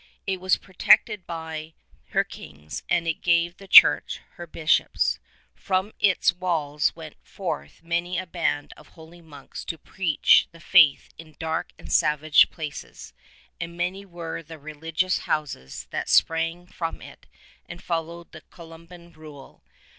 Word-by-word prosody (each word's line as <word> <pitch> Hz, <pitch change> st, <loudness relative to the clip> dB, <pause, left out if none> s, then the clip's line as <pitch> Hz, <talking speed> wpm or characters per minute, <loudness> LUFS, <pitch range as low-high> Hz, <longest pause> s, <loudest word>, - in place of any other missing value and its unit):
It 190 Hz, -2 st, -2 dB
was 185 Hz, 0 st, +2 dB
protected 190 Hz, 0 st, +2 dB
by 160 Hz, -1 st, -6 dB, 0.3 s
her -, -, +1 dB
kings, 75 Hz, +2 st, -10 dB
and 170 Hz, -1 st, +1 dB
it 165 Hz, -, -2 dB
gave 170 Hz, 0 st, +2 dB
the 195 Hz, -, -13 dB
Church -, -, +7 dB
her 175 Hz, -, -10 dB
bishops. 155 Hz, -1 st, +1 dB, 0.3 s
From 190 Hz, +2 st, -1 dB
its 190 Hz, -3 st, +3 dB
walls 160 Hz, -5 st, -1 dB
went 160 Hz, -2 st, -11 dB
forth 70 Hz, -, -6 dB
many 170 Hz, +2 st, -2 dB
a 185 Hz, -, -3 dB
band 165 Hz, -4 st, -2 dB
of -, -, -16 dB
holy 165 Hz, +1 st, -16 dB
monks 145 Hz, -4 st, -11 dB
to 165 Hz, -, -5 dB
preach 165 Hz, 0 st, +3 dB
the 165 Hz, -, -16 dB
faith 165 Hz, -5 st, +5 dB
in 155 Hz, -2 st, -13 dB
dark 160 Hz, 0 st, -3 dB
and -, -, -7 dB
savage 150 Hz, 0 st, +4 dB
places, 155 Hz, -3 st, -8 dB, 0.5 s
and 170 Hz, 0 st, -6 dB
many 180 Hz, +3 st, -2 dB
were 170 Hz, -4 st, -7 dB
the 160 Hz, 0 st, -11 dB
religious 160 Hz, +4 st, -2 dB
houses 135 Hz, -, -4 dB
that -, -, -4 dB
sprang 165 Hz, +2 st, +2 dB
from 165 Hz, -2 st, -5 dB
it -, -, -14 dB, 0.4 s
and -, -, -8 dB
followed 170 Hz, 0 st, -4 dB
the 155 Hz, -, -12 dB
Columban 170 Hz, +1 st, -14 dB
Rule. 150 Hz, -4 st, -14 dB
165 Hz, 145 wpm, -25 LUFS, 155-175 Hz, 0.5 s, Church